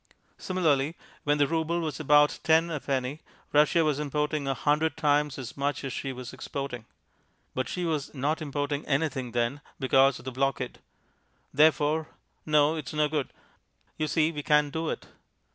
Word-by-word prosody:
Similarly, 160 -5 +1 0.3
when 145 0 +3
the 145 - +4
rouble 165 +2 0
was 155 -3 -3
about 150 0 +4
ten 165 +1 +4
a 150 - -2
penny, 135 +1 -2 0.3
Russia 150 +3 +5
was 150 -2 +1
importing 150 0 -1
a 135 - 0
hundred 150 +4 +1
times 150 -2 +2
as 130 -3 -7
much 140 +1 -2
as 135 - -4
she 135 - -3
was 125 -2 -8
exporting. 135 -5 -5 0.7
But 130 - -2
she 180 -1 -2
was 155 -4 -2
not 145 +4 -1
importing 145 0 -2
anything 135 -4 -1
then 120 +4 0 0.2
because 135 0 +4
of 120 - -14
the 130 - -4
blockade. 130 0 -1 0.7
Therefore 155 +1 +3 0.4
no, 150 0 +4
it's 155 -3 -6
no 150 0 +2
good. 150 -3 -2 0.6
You 155 - -1
see, 155 +2 +2
we 150 -2 -5
can't 150 0 +2
do 160 0 -2
it. - - -4
145 Hz, 165 wpm, -28 LUFS, 135-155 Hz, 0.7 s, Russia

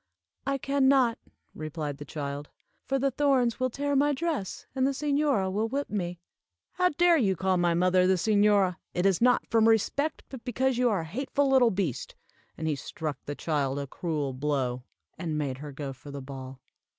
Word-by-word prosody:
"I 275 0 +1
can 275 0 +1
not," 260 -4 +4 0.3
replied 155 -2 -5
the 145 - -7
child, 145 0 -5 0.4
"for 270 - +1
the 270 +1 +1
thorns 260 -3 +2
will 255 0 +1
tear 285 +3 -1
my 290 +2 +3
dress, 300 - -3
and 265 0 +2
the 275 - 0
señora 280 -10 +1
will 215 +3 0
whip 280 +4 -3
me." 175 -4 -3 0.5
"How 360 -1 +2
dare 345 +1 +4
you 200 -9 +2
call 185 +1 +1
my 175 -1 +2
mother 180 +1 +3
the 190 - +4
señora? 205 -1 +3 0.2
It 180 - +1
is 195 0 +3
not 250 +1 +4
from 225 0 +5
respect, 280 +7 +1
but 260 -4 -9
because 255 +1 0
you 250 -1 +4
are 200 -6 +1
a - - -6
hateful 270 - -1
little 260 -3 +5
beast." 185 - -3 0.4
And 160 - -3
he 155 - +1
struck 150 +2 -5
the 145 - -3
child 140 -4 -1
a 140 - -2
cruel 145 -1 -3
blow, 130 -2 -1 0.3
and 160 -4 -2
made 135 -3 -2
her 145 0 -7
go 140 -1 -5
for 135 +2 -13
the 140 0 -6
ball. 130 -1 -8
195 Hz, 195 wpm, -28 LUFS, -, 0.5 s, from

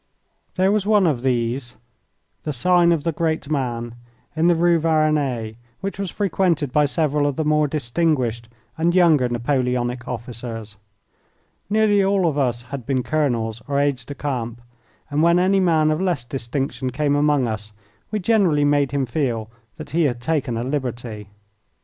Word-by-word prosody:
There 190 +1 +3
was 205 -1 0
one 210 -3 +4
of 145 -8 +1
these 120 0 -1 0.6
the 155 - -3
Sign 175 +5 +3
of 165 -4 +1
the 165 - 0
Great 160 -1 -2
Man 120 -5 -2 0.4
in 160 +2 +2
the 175 - +5
Rue 170 0 +3
Varennes, 150 -8 +1 0.3
which 195 0 -4
was 195 -2 -2
frequented 175 -8 0
by 150 +2 +3
several 145 -1 +1
of 145 - -1
the 155 - -1
more 150 0 +3
distinguished 130 -5 -1 0.3
and 170 +2 +2
younger 160 -8 +4
Napoleonic 125 0 -1
officers. 115 -3 -6 0.9
Nearly 210 -1 +3
all 195 -1 +2
of 155 - 0
us 120 -4 0
had 130 +1 -7
been 130 +1 -1
colonels 120 -7 -1
or 140 0 0
aides 140 -3 0
de 145 - -8
camp, 120 -5 -4 0.5
and 145 +1 +1
when 170 +1 +4
any 190 +2 +3
man 160 -4 +3
of 155 +3 -1
less 175 -9 0
distinction 130 +1 -3
came 145 +2 0
among 145 -3 +2
us 110 -1 -5 0.4
we 215 - -1
generally 185 -8 +2
made 145 -1 +2
him 140 -1 -1
feel 115 -4 -2 0.3
that 155 - -9
he 165 0 +2
had 120 -4 -1
taken 125 -3 -1
a 115 - -2
liberty. 120 -6 -4
145 Hz, 165 wpm, -22 LUFS, 120-165 Hz, 0.9 s, the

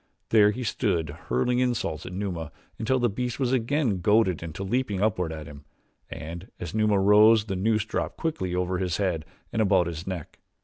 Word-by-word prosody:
There 105 -2 +6
he 125 +5 -3
stood 90 - 0 0.2
hurling 95 - +1
insults 115 - -1
at - - -6
Numa 90 -5 -4 0.3
until 115 +4 +1
the 120 -1 +2
beast 125 +4 -3
was 130 -1 +1
again 125 - +1
goaded 105 -4 +3
into 85 +3 -6
leaping 105 -1 -1
upward 95 -5 0
at 80 -1 -6
him, 70 0 -11 0.5
and 85 +4 -7
as 85 - -6
Numa 105 -2 +2
rose 105 +2 +6
the 95 -3 -3
noose 110 +3 +1
dropped 110 - -3
quickly 95 - -2
over 90 0 -1
his 90 -3 -1
head 90 -6 -1 0.3
and 110 - +1
about 95 -4 +4
his 85 +1 -6
neck. 90 -5 -6
100 Hz, 185 wpm, -26 LUFS, 90-110 Hz, 0.5 s, There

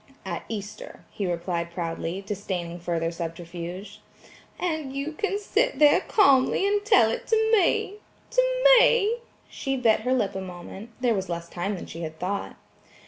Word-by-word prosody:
"At - - -4
Easter," 205 -2 -7
he 200 - -3
replied 170 0 -2
proudly, 170 +2 -4
disdaining 180 -4 -4
further 165 -1 -1
subterfuge. 175 +4 -7 0.6
"And 315 -6 -2
you 280 +3 -3
can 400 +5 -2
sit 440 +4 0
there 295 -1 +6
calmly 280 -2 +4
and 410 0 +1
tell 245 - +5
it - - -5
to 445 0 +2
me–to 420 +5 0 0.4
me–," 465 -1 +4 0.3
she 270 0 -3
bit 230 -4 +3
her 255 - 0
lip 215 -6 0
a 190 - -4
moment; 190 +4 -9
there 245 -2 +3
was 190 -3 -3
less 170 0 -4
time 180 +4 -3
than 180 - -7
she 165 - -8
had 160 -1 -6
thought. 195 +4 -3
205 Hz, 155 wpm, -26 LUFS, -, 0.6 s, there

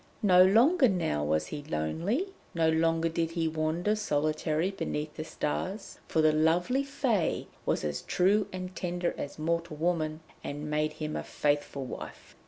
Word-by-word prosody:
No 185 -3 +7
longer 255 - +5
now 165 - 0
was 75 +1 +1
he 145 - -6
lonely, 165 - -1 0.3
no 165 -1 +3
longer 165 +1 +2
did 165 0 -1
he 165 -1 -1
wander 160 +6 0
solitary 155 -1 0
beneath 150 -5 -3
the 155 - -4
stars, 185 +7 -4
for 160 - +2
the 155 - +6
lovely 175 - +2
Fée 255 - 0 0.2
was - - +1
as 75 -1 -2
true 200 +3 +2
and 185 0 -6
tender 175 -1 -2
as 145 - -6
mortal 165 0 -2
woman, 160 -1 0 0.2
and 150 +1 -5
made 155 0 0
him 155 0 -4
a - - -2
faithful 145 -2 -1
wife. - - -9
165 Hz, 160 wpm, -29 LUFS, 155-185 Hz, 0.3 s, No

